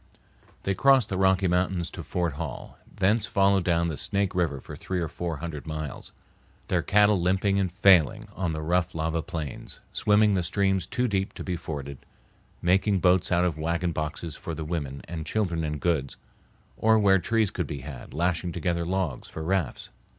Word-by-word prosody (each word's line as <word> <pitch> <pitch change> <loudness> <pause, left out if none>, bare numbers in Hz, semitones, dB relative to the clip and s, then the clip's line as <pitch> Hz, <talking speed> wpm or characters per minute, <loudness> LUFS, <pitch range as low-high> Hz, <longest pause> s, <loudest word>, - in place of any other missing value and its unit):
They 95 - 0
crossed 135 0 +4
the 95 - -2
Rocky 95 0 +3
Mountains 90 -1 0
to - - -7
Fort 85 -4 -2
Hall; - - -7
thence 105 +3 +1
followed 100 -1 +3
down 85 -1 +2
the 80 -3 -3
Snake 100 -2 0
River 85 -6 0
for - - -9
three 95 -1 -3
or 85 - -1
four 85 0 -4
hundred 80 -1 -6
miles, 75 -2 -5 0.6
their 90 -2 +2
cattle 105 0 +4
limping 95 +2 +2
and 95 -3 0
failing 100 +2 +4
on 90 -3 -1
the 80 0 -4
rough 85 +1 0
lava 80 +1 -1
plains; 80 -4 -6
swimming 105 0 +3
the 95 - +2
streams 95 0 +1
too 125 0 0
deep 95 -3 -1
to - - -6
be 90 - -2
forded, 70 -5 -6 0.6
making 95 +3 +3
boats 90 0 +3
out 90 0 +3
of 80 -4 -1
wagon 85 +2 0
boxes 75 0 -4
for 85 - -6
the 80 0 -5
women 70 -4 -4
and 80 -2 -6
children 85 -6 0
and 75 -1 -3
goods, 75 -6 -1 0.6
or 110 0 +4
where 100 -2 +5
trees 110 +3 +1
could 90 -5 -3
be 70 -2 -5
had, 70 -1 -9
lashing 85 +1 0
together 85 0 -1
logs 90 -7 -2
for 80 - -7
rafts. 90 -4 -1
90 Hz, 185 wpm, -26 LUFS, 80-95 Hz, 0.6 s, where